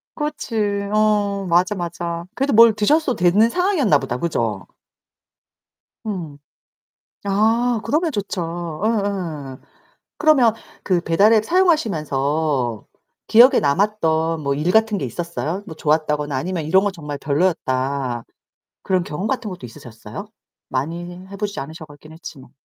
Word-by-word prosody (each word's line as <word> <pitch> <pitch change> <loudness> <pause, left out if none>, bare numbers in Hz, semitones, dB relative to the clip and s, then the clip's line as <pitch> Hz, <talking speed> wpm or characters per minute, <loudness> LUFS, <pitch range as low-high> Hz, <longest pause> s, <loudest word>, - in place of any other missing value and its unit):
그렇지. 210 -9 -2
어 205 -2 +1
맞아 180 +4 +3
맞아. 170 -1 -4
그래도 275 0 0
뭘 230 0 +8
드셨어도 255 +6 +2
되는 195 +6 +4
상황이었나보다. 240 - +1
그죠? 115 - -2 1.4
음. 170 -9 -5 0.9
아 225 +4 +2
그러면 320 +2 +1
좋죠. 205 -3 -3
어어. 170 - -3 0.6
그러면 265 -8 +5 0.3
그 180 -3 +1
배달 195 +7 +3
앱 215 - +3
사용하시면서 155 - 0 0.4
기억에 245 +4 +7
남았던 165 -1 +1
뭐 140 0 0
일 155 +5 0
같은 220 -2 +3
게 - - -3
있었어요? 170 - -4
뭐 160 - -9
좋았다거나 150 -2 0
아니면 170 +4 -3
'이런거 190 +6 +3
정말 150 -6 -7
별로였다.' 135 -6 -1 0.6
그런 185 -2 +1
경험 170 +5 -5
같은 235 -4 -2
것도 180 -9 -8
있으셨어요? 115 - -10 0.4
많이 165 +7 -3 0.2
해 200 - -8
보시지 205 0 -3
않으셔 160 +3 -8
갔긴 145 +1 -15
했지만. 140 -6 -11
175 Hz, 290 characters per minute, -20 LUFS, 150-215 Hz, 1.4 s, 뭘